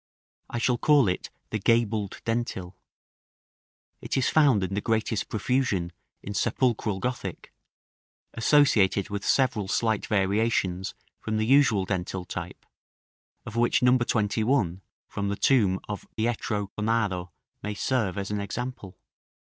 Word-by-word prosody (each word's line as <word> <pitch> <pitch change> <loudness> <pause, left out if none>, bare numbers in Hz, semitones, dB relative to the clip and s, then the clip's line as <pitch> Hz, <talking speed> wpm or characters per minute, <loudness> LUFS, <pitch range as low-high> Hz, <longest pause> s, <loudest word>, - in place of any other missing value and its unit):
I - - -4
shall 120 0 +1
call 145 -6 +5
it 90 - -2 0.2
the 110 - -1
gabled 110 -2 +1
dentil. 115 -6 -2 1.3
It - - -2
is 130 - +2
found 140 -10 +4
in 95 +1 -3
the 100 - -1
greatest 110 -1 -1
profusion 110 -6 0 0.3
in 105 - -5
sepulchral 110 -3 0
Gothic, 125 +3 -5 0.8
associated 115 -7 +3
with 100 0 -3
several 125 -7 +1
slight 110 +1 0
variations 100 -2 0 0.2
from 110 -1 -2
the 110 - +1
usual 115 -6 +4
dentil 95 -1 -3
type, - - -7 0.8
of 110 - -8
which 120 +1 +2
No. 125 0 +6
21, 110 -4 +1 0.3
from 100 0 -3
the 100 - -1
tomb 100 -7 +3
of 105 -1 -6
Pietro 110 -3 -1
Cornaro, 105 -5 0 0.3
may 105 0 -4
serve 110 -4 0
as 100 0 -3
an 105 -1 -1
example. 105 -3 -6
110 Hz, 130 wpm, -26 LUFS, 100-120 Hz, 1.3 s, No